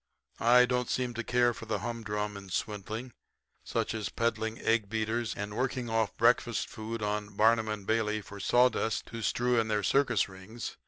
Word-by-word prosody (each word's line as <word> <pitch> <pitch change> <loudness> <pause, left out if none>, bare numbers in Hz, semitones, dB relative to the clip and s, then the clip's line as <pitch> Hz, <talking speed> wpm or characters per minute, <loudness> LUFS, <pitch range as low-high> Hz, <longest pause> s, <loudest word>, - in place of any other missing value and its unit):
I 125 +2 +6
don't 125 0 -1
seem 125 -1 -1
to 120 0 -3
care 120 +1 +3
for 115 0 -10
the 110 - 0
humdrum 105 -3 -3
in 100 -1 -9
swindling, 110 +4 -4 0.5
such - - -1
as 110 -2 -3
peddling 115 -1 -1
egg 110 -3 +1
beaters 110 +1 -1
and 105 +1 -5
working 125 -1 -1
off 110 -2 0
breakfast 120 -1 +3
food 110 0 -5
on 105 0 -2
Barnum 110 +1 +4
and 105 -2 -4
Bailey 110 -1 +1
for 100 0 -10
sawdust 120 0 +2
to 115 - -6
strew 120 +3 +2
in 110 - +1
their 105 -1 0
circus 135 +8 +3
rings. 95 +5 -8
110 Hz, 175 wpm, -30 LUFS, 105-120 Hz, 0.5 s, I